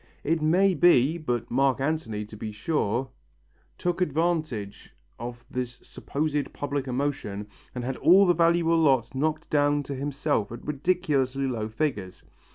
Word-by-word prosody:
It 160 +1 +1
may 185 +5 +4
be, 165 -2 +4
but 120 -6 -3
Mark 135 +1 +2
Antony, 135 -8 -2
to 105 - -12
be 110 0 -5
sure, 120 +1 -1 0.7
took 175 +1 -1
advantage 155 - -1 0.2
of 120 0 -7
this 125 -1 -4
supposed 145 -1 -3
public 140 -1 -3
emotion 125 -6 -2 0.3
and 125 - -3
had 130 +1 -3
all 185 +7 +6
the 175 - +4
valuable 165 0 +3
lots 135 -7 +3
knocked 155 +4 -1
down 145 0 +2
to 140 - -5
himself 140 -5 -1
at 120 - -9
ridiculously 140 -3 0
low 115 -5 -2
figures. 110 -7 -3
140 Hz, 145 wpm, -26 LUFS, 120-160 Hz, 0.7 s, all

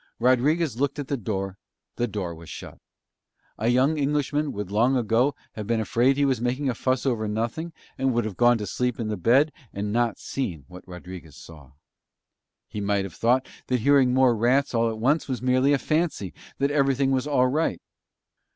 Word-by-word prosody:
Rodriguez 130 +4 +2
looked 140 +1 0
at 145 -2 -5
the 140 - +1
door, 95 -4 -4 0.4
the 120 - -1
door 100 -6 -4
was 80 -1 -12
shut. - - -9 0.8
A 110 - 0
young 130 +6 +3
Englishman 145 +1 0
would 100 -2 -6
long 120 +6 +3
ago 120 +4 +1 0.2
have 105 -2 -7
been 115 -1 +1
afraid 120 +5 +2
that 145 - -1
he - - +4
was 130 -4 0
making 130 +4 -1
a - - 0
fuss 130 +2 -1
over 115 -5 0
nothing 115 +10 -3 0.3
and 135 0 +2
would 120 -2 0
have 105 -4 -5
gone 120 +2 +4
to 105 - -4
sleep 125 +4 -2
in 110 -2 -2
the 105 - -1
bed, 130 - +3 0.2
and 105 +1 -4
not 120 -1 +1
seen 85 - -4
what 90 0 -13
Rodriguez 90 -4 -10
saw. 75 -5 -14 0.9
He 105 - -6
might 100 -1 0
have 95 - -8
thought 125 +3 +1 0.2
that 125 -2 0
hearing 135 0 +4
more 130 -2 +4
rats 125 +6 +2
all 115 -1 +2
at 110 - -4
once 135 +8 +1
was 130 -3 -2
merely 130 +2 +2
a 145 - +4
fancy, 155 - -1 0.3
and 140 - +3
that 145 - -4
everything 135 -1 +2
was 130 +1 0
all 135 -4 +3
right. 150 +6 0
125 Hz, 200 wpm, -25 LUFS, 105-135 Hz, 0.9 s, he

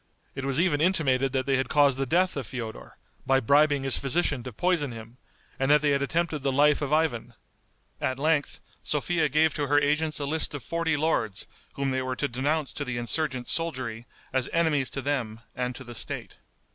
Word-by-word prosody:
It 135 0 -5
was 135 +1 0
even 165 -4 +2
intimated 135 -7 +2
that 130 -1 0
they 135 -1 +2
had 135 - -1
caused 140 -3 +3
the 135 - -1
death 180 +6 +2
of 135 -6 -4
Feodor, 115 -2 -7 0.3
by 135 0 +3
bribing 145 +2 +3
his 135 -1 +1
physician 140 -1 +1
to 125 +1 -7
poison 155 - 0
him, 115 +2 -11 0.4
and 135 +1 +1
that 150 0 +5
they 145 - +3
had 140 0 +1
attempted 160 +2 -1
the 135 0 -1
life 145 +2 +3
of 145 -1 -2
Ivan. 125 -7 0 0.7
At 130 - -1
length 150 0 0 0.2
Sophia 155 +1 0
gave 155 +2 +3
to 145 -1 -2
her 145 +1 +4
agents 150 +2 +1
a 145 - -2
list 155 +1 -1
of 145 - -6
forty 165 -2 -1
lords 145 -10 -1 0.3
whom 140 -1 -1
they 130 0 0
were 130 0 -3
to 145 - -1
denounce 140 +4 -1
to 145 - -4
the 125 -3 -4
insurgent 125 +2 -1
soldiery 130 -8 -1 0.3
as 130 -1 0
enemies 155 -6 +2
to 135 - -5
them 120 -6 -2
and 125 0 -2
to 130 - -8
the 120 -1 -9
State. - - -3
140 Hz, 205 wpm, -27 LUFS, 130-155 Hz, 0.7 s, that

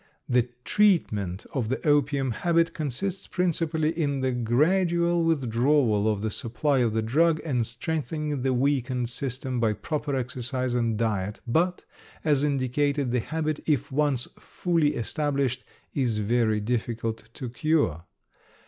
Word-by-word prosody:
The 125 -1 +2
treatment 110 - +2
of 120 -6 -1
the 130 - -2
opium 140 -2 +2
habit 165 +6 +1
consists 170 +6 -3
principally 165 -3 0
in 145 -5 -1
the 130 0 +1
gradual 170 +8 +2
withdrawal 125 -6 +2
of 105 -1 -1
the 110 - -1
supply 130 +6 0
of 120 -3 +2
the 110 0 0
drug 155 +8 +3
and 125 -7 0
strengthening 150 +3 -3
the 130 +1 +1
weakened 130 -2 0
system 130 0 -3
by 110 -2 +2
proper 145 +4 -3
exercise 130 0 -2
and 115 -3 +1
diet, 105 -3 -1
but, 170 +9 +1 0.4
as 145 -3 +3
indicated, 140 -1 0
the 125 - +2
habit, 155 +4 -2
if 145 -5 +1
once 140 -3 +1
fully 165 -4 0
established, 140 0 -1 0.3
is 125 -6 0
very 110 0 +1
difficult 115 0 -3
to 130 - -5
cure. 120 - 0
130 Hz, 135 wpm, -26 LUFS, 115-155 Hz, 0.4 s, drug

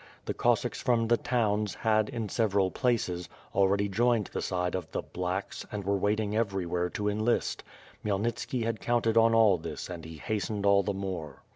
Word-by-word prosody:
The - - -2
Cossacks - - +1
from 115 -2 +2
the 120 +1 +4
towns 105 -5 0
had, 110 -1 +2
in 115 -5 -3
several 100 -3 +1
places, 105 -9 0 0.2
already 100 +1 +3
joined 115 +2 +1
the - - -2
side 90 -1 -1
of 90 -4 -3
the - - -3
'T)lacks" 90 +2 -4
and 105 -1 -4
were 100 +1 +1
waiting 105 +1 0
everywhere 90 -5 0
to 105 +3 -3
enlist. 110 +3 0 0.4
Khmyel 100 -2 0
nit 120 +1 -1
ski 125 -3 -2
had 115 -1 -2
counted 115 -2 +1
on 115 0 +5
all 105 -5 +5
this 85 +2 -6
and 85 -2 -7
he 80 0 -9
hastened 105 +4 -2
all 100 0 +5
the 100 0 -2
more. 90 -7 -5
105 Hz, 185 wpm, -29 LUFS, 95-115 Hz, 0.4 s, on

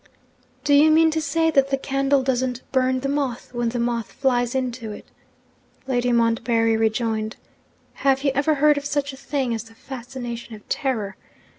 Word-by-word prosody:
'Do 290 0 +2
you 295 +2 +7
mean 320 +1 +5
to 320 0 -1
say 320 +2 +1
that 275 -2 +3
the 275 - +1
candle 275 0 +1
doesn't 255 -1 -1
burn 260 -1 +1
the 275 - -1
moth, 275 -4 -2
when 240 -1 0
the 245 - -3
moth 235 -1 -1
flies 245 -2 0
into 250 -4 -2
it?' 210 - -9 0.8
Lady 245 -2 0
Montbarry 230 -1 +2
rejoined. 220 0 0 0.6
'Have 270 0 +1
you 275 - +3
ever 295 +3 +2
heard 295 0 +4
of 285 - -12
such 285 -1 -1
a - - -8
thing 270 -2 -2
as 225 0 -4
the 225 0 -17
fascination 240 -2 -7
of 210 - -16
terror? 225 -9 -2
255 Hz, 175 wpm, -23 LUFS, 235-280 Hz, 0.8 s, you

